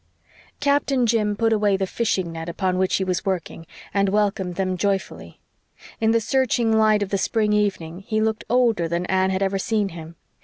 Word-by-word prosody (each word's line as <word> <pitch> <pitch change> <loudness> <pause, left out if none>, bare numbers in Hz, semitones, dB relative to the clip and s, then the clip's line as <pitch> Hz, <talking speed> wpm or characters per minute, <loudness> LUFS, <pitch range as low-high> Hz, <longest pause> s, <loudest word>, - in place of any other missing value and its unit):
Captain 280 -3 +1
Jim 215 -2 +1
put 225 +1 +1
away 205 -2 +2
the 190 - -1
fishing 190 -4 -1
net 165 +1 -6
upon 185 +1 -1
which 190 0 +1
he 190 - 0
was 185 -2 -2
working, 175 -3 -4 0.3
and 200 -1 +2
welcomed 195 -3 0
them 185 0 -1
joyfully. 195 +1 -3 0.6
In 220 - +2
the 230 0 +3
searching 235 -1 +1
light 215 -1 +3
of 195 - -6
the 195 - -1
spring 210 +1 +1
evening 185 -5 -1
he 215 +2 -2
looked 220 0 -1
older 230 -8 +2
than 170 +2 -2
Anne 190 +1 +1
had 190 +1 0
ever 195 0 0
seen 210 0 0
him. 165 -1 -10
200 Hz, 190 wpm, -22 LUFS, 185-220 Hz, 0.6 s, the